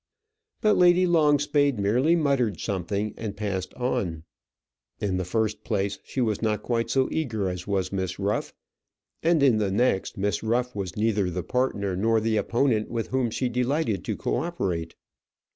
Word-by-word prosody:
But 215 -1 +4
Lady 180 +1 +5
Longspade 145 -5 +3
merely 120 +11 +3
muttered 135 - +1
something 100 +1 -2
and 105 -3 -5
passed 95 -3 -3
on. 105 -11 -2 0.8
In 100 -3 -1
the 95 - -1
first 110 +2 -1
place, 100 -1 -1
she - - -5
was 110 -5 0
not 105 -2 0
quite 115 -1 -1
so 130 -1 +2
eager 110 -11 -1
as 90 0 -5
was 95 -2 -1
Miss 95 -2 -2
Ruff; 100 +1 -1 0.7
and 165 -3 +3
in 125 -6 +5
the 105 -2 +1
next, 100 -1 +1
Miss 100 -2 0
Ruff 120 +2 0
was 95 -3 -4
neither 105 -3 +1
the 90 0 -3
partner 105 -6 -1
nor 110 +4 +2
the 110 0 0
opponent 115 -2 +1
with 115 -2 -3
whom 130 -2 +1
she 125 +3 -1
delighted 125 - 0
to - - -2
co - - -1
operate. 85 -3 -3
110 Hz, 165 wpm, -26 LUFS, 100-130 Hz, 0.8 s, Lady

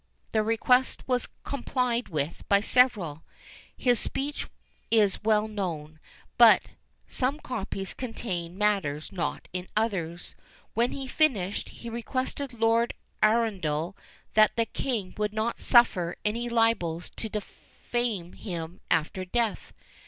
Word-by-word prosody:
The 220 - +3
request 240 +4 +2
was 250 -1 0
complied 250 -3 -1
with 150 -1 -2
by 200 - +6
several. 205 - +3 0.6
His 245 -3 +3
speech 285 +2 -3 0.4
is 210 -4 +3
well 215 0 +3
known; 165 -7 -4 0.4
but - - +8 0.4
some 275 +4 0
copies 195 -7 -4
contain 185 -8 -4
matters 195 -8 0
not 175 -3 -3
in 180 0 -4
others. 175 -6 -1 0.4
When 235 +2 +2
he 270 - -4
finished, 220 - +1
he 235 - -10
requested 255 +3 -3
Lord 230 0 +2 0.3
Arundel 195 -7 +1 0.4
that 215 0 +5
the 230 - +2
king 225 -4 -3
would 210 0 0
not 220 +2 -1
suffer 190 -8 +4
any 235 +3 -1
libels 225 -8 +1
to 220 - -2
defame 210 -2 -4
him 175 -3 -6
after 160 +4 +1
death. 225 +3 -1
215 Hz, 120 wpm, -28 LUFS, 180-240 Hz, 0.6 s, but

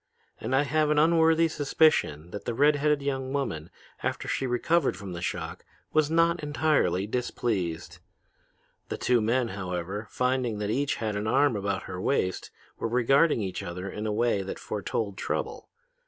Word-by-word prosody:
And 130 - -1
I 140 - +4
have 155 +1 +1
an 150 - +2
unworthy 165 +1 +5
suspicion 145 - +2
that 100 +1 -7
the 120 - -2
red 145 +4 +5
headed 150 0 +1
young 135 -2 -2
woman, 85 - -2 0.3
after - - -2
she 135 - -1
recovered 160 +8 +1
from 100 -3 -7
the 85 - -6
shock, - - -4 0.3
was 155 -1 +3
not 165 +1 +3
entirely 145 - +1
displeased. 105 -7 -2 0.9
The - - -3
two 125 -2 +2
men, 115 +2 +1
however, 95 +1 -4
finding 125 -3 0
that 105 0 -2
each 140 +4 0
had 110 -2 -3
an 105 +1 -2
arm 135 +2 +3
about 100 -1 -2
her 90 0 -6
waist, 95 -6 0 0.3
were - - -1
regarding 125 +2 +3
each 95 -2 -4
other 90 +3 -5
in 105 +1 -4
a - - 0
way 110 -1 +1
that 95 - -5
foretold 100 -1 -3
trouble. - - -3
120 Hz, 170 wpm, -27 LUFS, 100-145 Hz, 0.9 s, unworthy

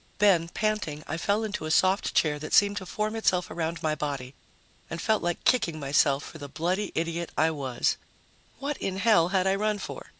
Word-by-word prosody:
Then, 190 -5 +4
panting, 205 -8 -2
I - - -3
fell 205 +5 0
into 210 -7 -4
a - - -4
soft 190 +5 +2
chair 150 -2 +2
that 155 - -6
seemed 205 0 +5
to 185 -2 -5
form 215 +3 -2
itself 185 -5 +1
around 165 0 -3
my 155 -1 +1
body, 140 -4 -4 0.6
and 170 - -5
felt 215 +5 +1
like 175 0 -2
kicking 170 -11 +2
myself 140 0 +2
for 160 - -10
the 145 -1 -8
bloody 180 +8 -1
idiot 170 +1 -2
I 160 +1 +3
was. 135 -5 -1 0.6
What 285 +1 -3
in 190 -1 -3
hell 200 -5 +4
had 190 0 +1
I 190 - +3
run 210 +1 0
for? 200 - -7
175 Hz, 200 wpm, -27 LUFS, 155-205 Hz, 0.6 s, seemed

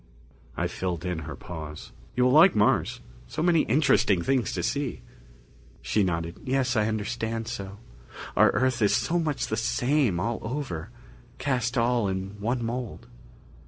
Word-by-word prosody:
I - - 0
filled 90 -2 -3
in 90 -2 -2
her 75 - -5
pause. 75 -2 -8 0.2
"You 125 - +3
will 125 - +4
like 165 +6 +7
Mars. 105 0 +2 0.3
So 155 - -3
many 170 -2 +4
interesting 110 - +3
things 130 -2 +1
to 90 - -2
see." 140 +4 -2 0.8
She 110 - +1
nodded. 85 -2 -2
"Yes, 130 -1 0
I 110 -1 +2
understand 110 +1 -2
so. 100 -4 -6 0.6
Our - - +6
Earth 130 -2 +1
is 105 - +4
so 175 +1 +1
much 155 -4 -1
the 110 - -2
same 120 - +1
all 115 +4 -1
over, 115 - -4 0.5
cast 125 -2 -1
all 120 -2 +2
in 95 +1 -4
one 120 +3 -1
mould." 120 -1 -4
115 Hz, 155 wpm, -27 LUFS, 95-130 Hz, 0.8 s, like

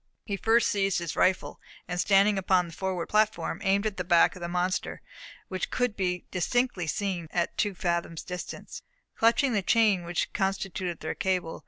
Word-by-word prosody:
He 200 - -2
first 225 +4 +3
seized 195 -2 +1
his 170 -2 -3
rifle, 185 0 +1 0.3
and 180 0 -1
standing 200 +1 +4
upon 185 -1 +2
the 170 - -10
forward 185 -1 -2
platform, 215 0 +1
aimed 200 +1 +2
it - - +3
at 200 - -18
the 185 - -2
back 170 -1 +4
of 180 - -11
the 170 - -3
monster, 180 +2 -1 0.5
which 185 -1 -3
could 245 -4 0
be 180 -2 -2
distinctly 190 -1 0
seen 180 -2 -2
at 175 +1 -1
two 205 -2 0
fathoms' 170 -2 -2
distance, 180 0 -7 0.3
clutching 235 +3 +3
the 205 - +2
chain 210 -3 +3
which 170 0 -2
constituted 190 -3 -2
their 155 - -3
cable. 180 -3 -1
190 Hz, 180 wpm, -28 LUFS, 175-205 Hz, 0.5 s, standing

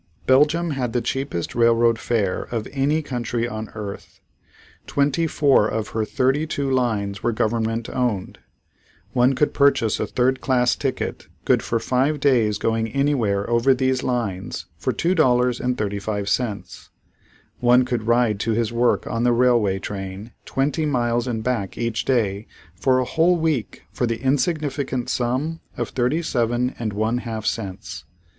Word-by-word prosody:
Belgium 150 +6 +3
had 125 -5 -2
the 120 - +1
cheapest 135 -9 -3
railroad 115 -1 +3
fare 105 -6 0
of 115 -3 -3
any 145 +3 +1
country 120 -3 -2
on 110 -2 -6
earth. 105 -2 -8 0.7
Twenty 145 +3 +1
four 140 -8 +3
of 110 -1 -3
her 110 -1 -1
thirty 130 +8 +1
two 140 -3 -2
lines 110 -6 0
were 120 - +1
government 115 +1 -1
owned. 120 -7 -2 0.7
One 125 +1 +3
could 150 - +1
purchase 140 -6 +3
a - - -1
third 130 +1 +1
class 125 -2 +2
ticket, - - -3 0.2
good - - +3
for 115 - -1
five 135 +6 0
days 120 -7 +3
going 115 +1 0
anywhere 115 -6 0
over 120 +3 +3
these 130 0 +1
lines 105 -7 -3
for - - -2
$2.35. 115 - 0 0.7
One 125 +1 +4
could 120 -3 -3
ride 120 -3 +2
to 115 +2 0
his 115 0 -1
work 120 +1 +2
on 115 0 -2
the 120 0 +4
railway 120 -5 +3
train 95 +2 -6
twenty 145 +3 0
miles 120 -3 0
and 110 -3 -2
back 115 -6 -2
each 115 -1 -2
day 110 -5 0 0.3
for 130 +9 +2
a 130 - +1
whole 165 +6 +2
week 155 -8 -2
for 125 - -1
the 115 0 -2
insignificant 140 -3 -1
sum 130 +7 -1 0.2
of - - -2
thirty 130 +7 0
seven 120 -2 0
and 115 -3 -2
one 110 +4 0
half 110 -3 -5
cents. 100 -5 -4
120 Hz, 150 wpm, -22 LUFS, 110-130 Hz, 0.7 s, One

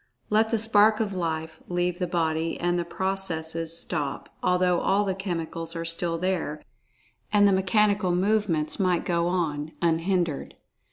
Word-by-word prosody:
Let 220 +1 +3
the 230 - +1
spark 215 0 +4
of 210 -3 -1
Life 160 -3 -3
leave 175 0 -1
the 180 - -1
body, 165 -1 -1
and 175 0 +1
the - - 0
processes 165 -3 -3
stop, 145 -4 -3
although 180 -1 +2
all 200 +2 +2
the 190 - 0
chemicals 165 -3 -4
are 165 - -3
still[Pg 165 0 -1
60] - - -2
there, 180 -5 -2 0.7
and 205 -1 +5
the 200 - +4
"mechanical 195 -1 +2
movements" 185 -5 +1
might 180 -3 +1
go 170 -1 +1
on 160 -4 -2
unhindered. 170 -1 0
175 Hz, 155 wpm, -26 LUFS, 165-195 Hz, 0.7 s, and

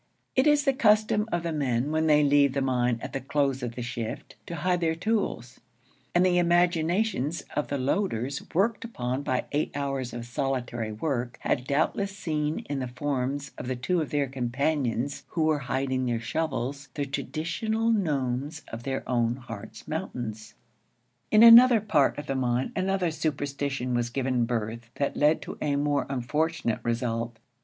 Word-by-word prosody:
It 260 +3 +4
is 295 -1 +4
the 275 - +4
custom 215 -2 +3
of 175 -1 0
the 170 - -2
men, 135 -2 0
when 160 0 +1
they 150 -1 +5
leave 140 -1 +4
the 140 - 0
mine 125 -2 +1
at - - -6
the 135 - -2
close 135 0 0
of 120 -1 -4
the 120 - -4
shift, 120 -2 -5
to 170 - -4
hide 180 +2 0
their 160 -1 +1
tools; 180 - -2 0.6
and 175 +1 +5
the 180 -1 +3
imaginations 175 - +2
of 150 - 0
the 140 - -2
loaders, 140 - -1
worked 205 +7 +1
upon 130 - -3
by 130 -3 -1
eight 150 +1 0
hours 135 -3 -2
of 120 0 -6
solitary 120 -3 -2
work, 120 +1 -2
had 125 0 -1
doubtless 195 +7 0
seen 155 -4 -2
in 145 -1 -2
the 130 - -2
forms 135 +1 -2
of 125 0 -4
two 175 +6 +1
of 150 - -3
their 145 -1 +1
companions 135 +1 -1
who 165 - -1
were 155 -1 +2
hiding 130 -1 -1
their 120 -1 0
shovels 140 +1 -3
the 145 - -1
traditional 170 - -1
gnomes 145 - -1
of 115 - -6
their 135 +1 -3
own 120 -1 +1
Hartz 115 -4 -10
Mountains. 115 - -5 0.7
In 215 +1 +6
another 235 +1 +10
part 160 -10 +2
of 145 - -5
the - - -2
mine 125 -1 0
another 185 -2 0
superstition 140 -4 -2
was 120 0 0
given 130 -1 0
birth 115 0 -3
that 140 - -1
led 150 +2 +3
to - - -8
a 145 -2 +1
more 145 0 +1
unfortunate 140 0 -1
result. 115 0 -2
140 Hz, 170 wpm, -27 LUFS, 125-165 Hz, 0.7 s, another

